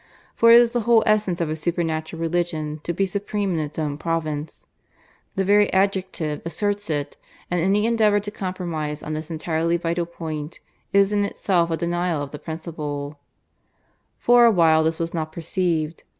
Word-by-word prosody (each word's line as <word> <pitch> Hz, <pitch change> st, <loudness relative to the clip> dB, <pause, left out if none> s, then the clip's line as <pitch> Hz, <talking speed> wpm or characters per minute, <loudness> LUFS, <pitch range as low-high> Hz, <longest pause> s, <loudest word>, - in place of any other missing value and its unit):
For 230 Hz, 0 st, +6 dB
it 235 Hz, -, +10 dB
is 240 Hz, -1 st, +3 dB
the 240 Hz, -, 0 dB
whole 230 Hz, -2 st, +6 dB
essence 210 Hz, -5 st, +1 dB
of 165 Hz, -, 0 dB
a -, -, -1 dB
Supernatural 165 Hz, -1 st, -2 dB
Religion 165 Hz, -2 st, -2 dB
to -, -, -1 dB
be 195 Hz, +3 st, 0 dB
supreme 200 Hz, 0 st, -2 dB
in 165 Hz, -, 0 dB
it 150 Hz, -1 st, -5 dB
own 150 Hz, -2 st, -2 dB
province 155 Hz, -2 st, -3 dB, 0.7 s
the 195 Hz, -, 0 dB
very 205 Hz, +1 st, +4 dB
adjective 190 Hz, -5 st, 0 dB
asserts 205 Hz, +3 st, -2 dB
it; 145 Hz, -2 st, -2 dB, 0.3 s
and 175 Hz, -1 st, +1 dB
any 200 Hz, +4 st, +2 dB
endeavour 220 Hz, -3 st, +3 dB
to 205 Hz, +1 st, -6 dB
compromise 170 Hz, -7 st, -4 dB
on 155 Hz, -, -4 dB
this 155 Hz, +1 st, -5 dB
entirely 165 Hz, +1 st, 0 dB
vital 170 Hz, 0 st, -2 dB
point 160 Hz, -2 st, -6 dB, 0.3 s
is 200 Hz, +1 st, +4 dB
in 205 Hz, 0 st, +2 dB
itself 180 Hz, -4 st, 0 dB
a 165 Hz, -, -1 dB
denial 175 Hz, 0 st, -1 dB
of 140 Hz, -, -8 dB
the 150 Hz, -, -7 dB
principle, 150 Hz, -3 st, -6 dB, 1.0 s
For 240 Hz, 0 st, +5 dB
a 230 Hz, -, +6 dB
while 160 Hz, -4 st, +4 dB
this 160 Hz, 0 st, 0 dB
was 165 Hz, 0 st, -3 dB
not 155 Hz, -2 st, -3 dB
perceived. 165 Hz, -1 st, -2 dB
170 Hz, 175 wpm, -23 LUFS, 155-195 Hz, 1.0 s, it